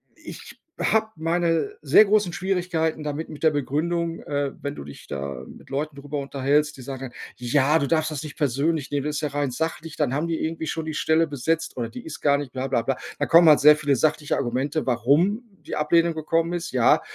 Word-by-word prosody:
ich - - -11 0.2
habe 220 0 +2
meine 170 - 0
sehr 215 - +6
großen 205 -3 +2
Schwierigkeiten 175 -4 -1
damit, 150 +2 -4
mit 150 - -10
der 160 - +6
Begründung. 165 +4 -1
Äh, 145 -1 -2
wenn 145 0 -4
du - - -8
dich 70 - -12
da 70 0 -5
mit - - -14
Leuten 145 +2 -3
darüber 145 +1 -5
unterhältst, 140 +2 0
die 130 - -10
sagen 135 0 -7
dann: - - -24 0.2
„Ja, 135 +5 +2
du 140 - -1
darfst 155 -1 +1
das 150 -2 -4
nicht 155 0 -9
persönlich 145 +1 0
nehmen, 145 -1 -1
das 150 0 -2
ist - - -2
ja 150 - -1
rein 145 -1 -1
sachlich. 160 +3 -4
Dann 140 -4 0
haben 150 +4 -1
die 165 - -2
irgendwie 160 0 -3
schon 160 +1 -3
die 160 - -4
Stelle 160 +2 +2
besetzt, 160 +3 -2
oder 115 -2 -2
die 115 - -10
ist 160 - -8
gar 140 -1 +4
nicht 140 -3 -6
bla, 130 0 -3
bla, 120 -3 +1
bla.“ 135 +2 -1 0.2
Da - - +1
kommen 170 0 +7
halt 150 - +7
sehr 150 +1 +8
viele 145 -2 +1
sachliche 150 +1 +1
Argumente, 135 +4 -1
warum 145 - +2 0.2
die - - -4
Ablehnung 165 +2 +2
gekommen 165 +2 0
ist. 175 -1 -4
Ja, 125 -3 +4
150 Hz, 220 wpm, -24 LUFS, 140-165 Hz, 0.2 s, sehr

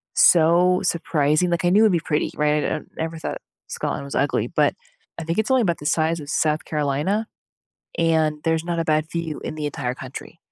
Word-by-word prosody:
so 175 +2 +5
surprising, 165 -1 +1
like, 170 0 0
I 175 - +3
knew 205 +5 +5
it'd 220 - +5
be 175 - +2
pretty, 155 -2 -1
right? 150 0 +1
I - - 0
n - - -21
never 160 0 -4
thought - - -4 0.3
Scotland - - -3
was 70 - -7
ugly, - - +1
but - - +1 0.5
I - - -4
think 165 +1 -2
it's 220 +3 0
only 260 -1 +4
about 170 -7 0
the 150 - -10
size 160 +2 +1
of 145 - -9
South 155 0 0
Carolina, 150 +9 -1 0.7
and 160 -2 +1
there's 160 0 +1
not 170 -1 -2
a 165 - 0
bad 155 0 0
view 165 -3 -4
in 155 - -5
the 150 -1 -3
entire 125 -3 -3
country. 135 +5 -9
160 Hz, 210 wpm, -22 LUFS, 150-170 Hz, 0.7 s, so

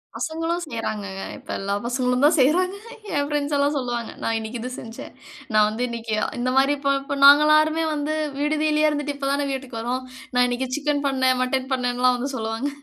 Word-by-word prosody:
பசங்களும் 330 +2 -2
செய்யுறாங்கங்க. 210 -7 -4
இப்ப - - -18
எல்லா 200 +1 -2
பசங்களும் 250 +1 0
தான் 305 - +5
செய்யுறாங்க 360 +8 +3 0.4
என் 285 0 +1
ஃப்ரெண்ட்ஸ் 295 0 -1
எல்லாம் 285 +1 +1
சொல்லுவாங்க. 240 -3 -3
நான் 225 0 0
இன்னைக்கி 220 +2 -6
இது 250 +2 -5
செஞ்சேன், 225 0 -9 0.4
நான் 215 0 +5
வந்து 220 +3 -3
இன்னைக்கி 230 -1 -5 0.3
இந்தமாரி 265 +3 +2
இப்ப 275 0 +1
இப்ப 280 +1 -4
நாங்க 285 +1 +9
எல்லாருமே 310 +1 +4
வந்து 300 +1 -2 0.2
விடுதியிலேயே 305 +1 +2
இருந்துட்டு 290 -1 -2
இப்ப 275 -1 -2
தானே 285 0 0
வீட்டுக்கு 260 -4 -6
வரோம். 250 +2 -2 0.3
நான் 250 0 +5
இன்னைக்கி 250 +1 -2
சிக்கன் 295 -1 -1
பண்ணேன், 260 -1 +2
மட்டன் 260 +1 -2
பண்ணேன்லாம் 250 0 +1
வந்து 275 +3 -3
சொல்லுவாங்க. 225 +3 -2
265 Hz, 180 wpm, -23 LUFS, 245-295 Hz, 0.4 s, நாங்க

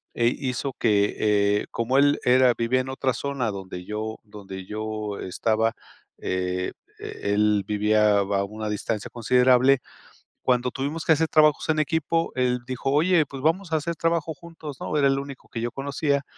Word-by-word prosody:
eh, 120 0 +2
hizo 130 +1 -2
que, 105 -2 +2
eh, 105 -1 +2
como 120 +3 0
él 145 +1 +4
era 125 0 +5
vivía 120 +2 +1
en 130 - -3
otra 130 -1 -1
zona, 130 -2 -2
donde 95 -2 -7
yo 110 +2 -4
donde 95 -3 -9
yo, 110 -1 -4
estaba, 110 +4 0 0.4
eh, 90 0 -2 0.3
e 100 - -3
él 105 -1 +2
vivía 105 0 +3
a - - +2
va 100 0 0
una 110 +2 -6
distancia 105 0 -3
considerable. 125 +2 +4 0.7
Cuando 125 -1 +1
tuvimos 145 +4 -3
que 160 - +4
hacer 160 +1 +2
trabajos 155 -1 +3
en 155 -1 +2
equipo, 160 +1 0
él 125 -1 +1
dijo: 130 +1 -2
"Oye, 160 +3 +4
pues 135 -1 -8
vamos 165 +3 0
a - - +4
hacer 170 +2 -2
trabajo 165 -1 -1
juntos, 160 -3 -10
¿no?" - - -3
Era 140 -2 +3
el 135 0 +2
único 140 -1 -10
que 115 - -5
yo 120 +1 -2
conocía. 140 +2 -1
125 Hz, 175 wpm, -25 LUFS, 105-140 Hz, 0.7 s, era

